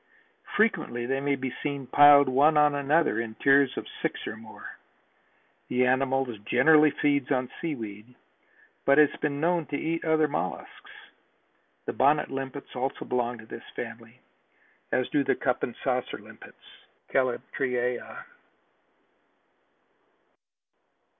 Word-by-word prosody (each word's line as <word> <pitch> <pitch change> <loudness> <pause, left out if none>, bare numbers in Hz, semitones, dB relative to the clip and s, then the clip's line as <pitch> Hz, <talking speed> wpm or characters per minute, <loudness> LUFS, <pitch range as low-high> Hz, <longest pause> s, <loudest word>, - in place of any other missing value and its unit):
Frequently 160 - +1
they 135 +2 -1
may 140 0 0
be 130 -2 -5
seen 140 -2 -3
piled 145 +1 +7
one 145 +4 +4
upon 150 -1 +4
another 145 -3 +1
in 110 -1 -7
tiers 140 0 +3
of - - -4 0.2
six - - -3
or - - -5
more. 110 -1 -12 0.9
The 125 0 +1
animal 135 +1 +1 0.2
generally 150 +7 +5
feeds 145 -2 0
on 130 -3 -1
seaweed 115 -6 -6 0.7
but 140 0 +4
has 150 -1 +5
been 145 -1 -1
known 170 0 0
to 145 - -3
eat 165 +2 -2
other 160 -1 +2
mollusks. 90 - -5 1.0
The - - -3
bonnet 145 +3 +2
limpets 135 +1 -6
also 130 +2 -3
belong 120 -1 -1
to 110 - -13
this - - -9
family, - - -8 0.7
as 130 - +1
do 145 - +1
the - - +1
cup 125 -2 -1
and 120 - -3
saucer 125 -2 -1
limpets - - -15 0.5
(Calyptraea). 125 -1 -2
135 Hz, 125 wpm, -27 LUFS, 125-145 Hz, 1.0 s, piled